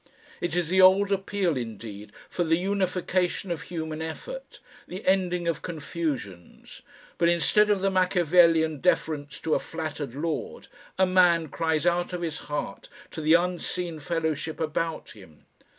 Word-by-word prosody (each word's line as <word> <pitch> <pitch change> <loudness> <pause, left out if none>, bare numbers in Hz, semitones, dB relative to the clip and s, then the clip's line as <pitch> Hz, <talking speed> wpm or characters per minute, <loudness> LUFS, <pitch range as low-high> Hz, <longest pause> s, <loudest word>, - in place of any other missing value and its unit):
It 175 -1 -2
is 175 -3 0
the 190 +1 +4
old 195 +2 +6
appeal 195 -3 0
indeed 110 -4 -7 0.2
for 175 - -1
the 165 0 +2
unification 185 -1 -1
of 165 -4 -3
human 160 -2 -5
effort, - - -7 0.3
the 185 +4 -8
ending 180 -2 +1
of 170 - -1
confusions, 150 - -5 0.4
but 170 - +4
instead 210 +5 +3
of 205 -2 +2
the 195 0 +1
Machiavellian 175 -4 +3
deference 150 -4 0
to 160 - 0
a - - +3
flattered 155 -5 -5
lord, 170 - -4 0.3
a 190 - +5
man 175 -3 +4
cries 160 0 -1
out 175 +1 +1
of 175 -1 -3
his 160 -2 -3
heart 145 - -4 0.2
to 160 - -6
the 155 +2 +5
unseen 175 -1 -1
fellowship 160 -1 -2
about 160 +1 -2
him. 95 -8 -16
170 Hz, 150 wpm, -26 LUFS, 155-185 Hz, 0.4 s, old